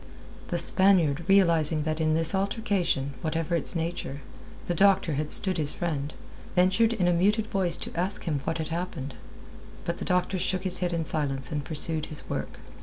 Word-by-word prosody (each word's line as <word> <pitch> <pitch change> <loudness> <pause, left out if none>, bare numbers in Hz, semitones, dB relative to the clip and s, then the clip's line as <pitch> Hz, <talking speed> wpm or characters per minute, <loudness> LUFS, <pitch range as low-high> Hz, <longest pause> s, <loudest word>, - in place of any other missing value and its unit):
The - - -2
Spaniard, 170 -6 +3
realizing 165 -5 +3
that 155 +1 -2
in 155 0 +2
this 165 0 +2
altercation, 195 - -1
whatever 165 +1 -1
its 170 - +3
nature, 165 -4 -4 0.4
the 175 - -1
doctor 195 -2 +3
had 150 +2 -2
stood 185 -4 +3
his 150 -1 +4
friend, 150 -4 -3 0.4
ventured 190 +6 +3
in 190 -6 0
a 175 - +3
muted 205 +5 +2
voice 185 -5 -1
to - - -7
ask 185 +4 -1
him 155 -5 -1
what 165 0 -2
had 160 -1 -4
happened. 165 -5 -4 0.7
But 170 0 -3
the - - -4
doctor 180 0 0
shook 185 +1 0
his 185 -2 -2
head 180 -1 -1
in 165 -1 -2
silence, 140 -4 -1
and 150 -1 -2
pursued 155 +2 -1
his 155 - -8
work. - - -5
170 Hz, 180 wpm, -27 LUFS, 155-185 Hz, 0.7 s, his